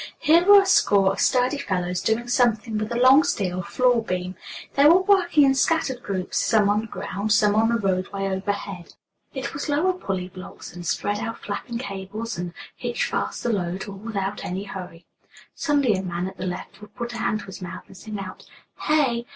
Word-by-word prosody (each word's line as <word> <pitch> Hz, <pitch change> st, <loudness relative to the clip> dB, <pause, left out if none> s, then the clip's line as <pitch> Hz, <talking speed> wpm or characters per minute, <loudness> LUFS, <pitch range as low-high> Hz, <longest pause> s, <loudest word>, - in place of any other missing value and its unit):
Here 325 Hz, +3 st, +4 dB
were 400 Hz, +1 st, +8 dB
a -, -, -6 dB
score 195 Hz, -, +4 dB
of 195 Hz, -, -5 dB
sturdy 255 Hz, +3 st, +2 dB
fellows 180 Hz, -4 st, -2 dB
doing 225 Hz, +2 st, 0 dB
something 235 Hz, -2 st, +1 dB
with 215 Hz, +1 st, -4 dB
a -, -, -1 dB
long 260 Hz, +4 st, +7 dB
steel 190 Hz, -, -1 dB
floor 245 Hz, +5 st, +2 dB
beam. 185 Hz, -3 st, -3 dB, 0.4 s
They 280 Hz, -, +4 dB
were 355 Hz, +4 st, +6 dB
working 360 Hz, -6 st, +4 dB
in 270 Hz, -1 st, +5 dB
scattered 270 Hz, -2 st, +1 dB
groups, 190 Hz, -4 st, -2 dB
some 210 Hz, -3 st, +3 dB
on 210 Hz, +1 st, +2 dB
the 225 Hz, -, -8 dB
ground, 205 Hz, 0 st, -4 dB
some 210 Hz, -1 st, +4 dB
on 220 Hz, +1 st, +3 dB
the 235 Hz, -, +2 dB
roadway 195 Hz, -1 st, -1 dB
overhead. 195 Hz, -1 st, -4 dB, 0.4 s
It 265 Hz, 0 st, -4 dB
was 285 Hz, +2 st, -4 dB
lower 320 Hz, +6 st, +2 dB
pulley 190 Hz, -, -4 dB
blocks, 185 Hz, 0 st, -10 dB
and 175 Hz, -1 st, -7 dB
spread 205 Hz, 0 st, -1 dB
out 230 Hz, +1 st, -5 dB
flapping 220 Hz, +3 st, -4 dB
cables, 210 Hz, 0 st, -5 dB
and 175 Hz, 0 st, -5 dB, 0.2 s
hitch -, -, -2 dB
fast -, -, -3 dB
the 240 Hz, -, +1 dB
load, 185 Hz, 0 st, -3 dB
all 200 Hz, -, -7 dB
without 200 Hz, -1 st, -4 dB
any 185 Hz, +2 st, -4 dB
hurry. 180 Hz, -4 st, -9 dB, 0.5 s
Suddenly 285 Hz, -6 st, +2 dB
a 190 Hz, -, -1 dB
man 175 Hz, -1 st, -3 dB
at 190 Hz, -, -9 dB
the 185 Hz, -, -4 dB
left 180 Hz, +3 st, -7 dB
would 210 Hz, -, -14 dB
put 240 Hz, -1 st, -5 dB
a -, -, -5 dB
hand 225 Hz, -2 st, 0 dB
to -, -, -11 dB
his 190 Hz, 0 st, -10 dB
mouth 175 Hz, -2 st, -7 dB
and 190 Hz, -, -16 dB
sing 215 Hz, +2 st, -7 dB
out: 190 Hz, -2 st, -8 dB, 0.4 s
"Hey 305 Hz, -, +4 dB
y -, -, -1 dB
y!" 235 Hz, -, -6 dB
210 Hz, 210 wpm, -24 LUFS, 190-250 Hz, 0.5 s, were